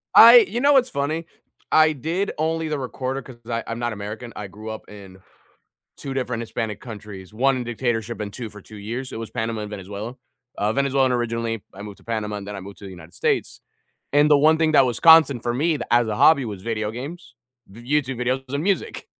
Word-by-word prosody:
I - - +11
you 240 - -3
know 285 +1 +5
what's 260 -2 +4
funny? 155 +4 -2 0.5
I 155 0 +6
did 165 +8 -2
only 160 +1 -1
the 150 -2 -2
recorder 130 +1 -4
'cause 125 -1 -13
I 115 0 -2
I'm 115 0 -4
not 120 -1 -2
American 110 +3 -7
I 105 - -6
grew 105 +3 -9
up 110 - -8
in 95 -2 -12 0.8
2 135 - -6
different 125 -3 -2
Hispanic 110 -2 -4
countries, 105 -5 -10
1 135 +4 +2
in 125 - -3
dictatorship 120 -1 -2
and 100 -1 -5
2 120 -3 -6
for 105 0 -13
2 105 +2 -13
years, 120 +6 -5
it - - -6
was 115 - -6
Panama 110 -1 -3
and 105 - -6
Venezuela. 105 +4 -7 0.4
Uh, 105 +2 0
Venezuelan 135 -1 +2
originally, 115 -2 -2
I 100 - -10
moved 105 -2 -9
to - - -22
Panama, 105 -2 -3
and 100 -1 -8
then 105 - -5
I - - -6
moved 100 +1 -11
to - - -14
the - - -7
United 90 -2 -12
States. - - -1 0.5
And 145 +1 +4
the 145 - +7
one 155 +2 +4
thing 160 -1 +2
that 140 -3 +6
was 120 -3 -2
constant 160 -7 +7
for 120 0 -1
me 150 +7 0
th - - -4
as 120 0 +4
a 105 - -2
hobby 150 0 +5
was 100 -5 -6
video 110 -1 -2
games, 135 +5 -8 0.3
v 100 +4 -13
YouTube 135 -1 -1
videos 130 +2 -1
and 140 - -1
music. 195 +2 -1
120 Hz, 225 wpm, -23 LUFS, 105-140 Hz, 0.8 s, I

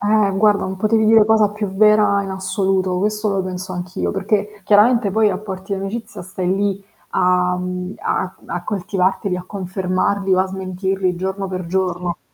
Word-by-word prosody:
Eh 210 0 +3
guarda, 210 0 +3
non 190 0 -4
potevi 220 +2 +2
dire 220 -1 +6
cosa 215 -1 +3
più 210 0 -4
vera 205 0 +4
in 195 - -6
assoluto, 190 -1 0
questo 210 +2 0
lo 195 -1 0
penso 185 0 -5
anch'io, 180 0 -3
perché 205 +1 -2
chiaramente 210 +2 +4
poi 220 +2 +3
i - - +5
rapporti 190 0 -5
d'amicizia 205 +4 -5
stai 185 0 -2
lì 200 0 -1 0.3
a, 180 0 +2
mhmm, 180 +1 -4
a 185 - -2
a 175 - -4
coltivarteli, 190 -1 -1
a 180 - -7
confermarli 190 0 -1
o 185 - +3
a 190 - +1
smentirli 190 0 -2
giorno 190 +2 -3
per 185 -1 -4
giorno. 180 -1 -2
195 Hz, 170 wpm, -19 LUFS, 185-210 Hz, 0.3 s, dire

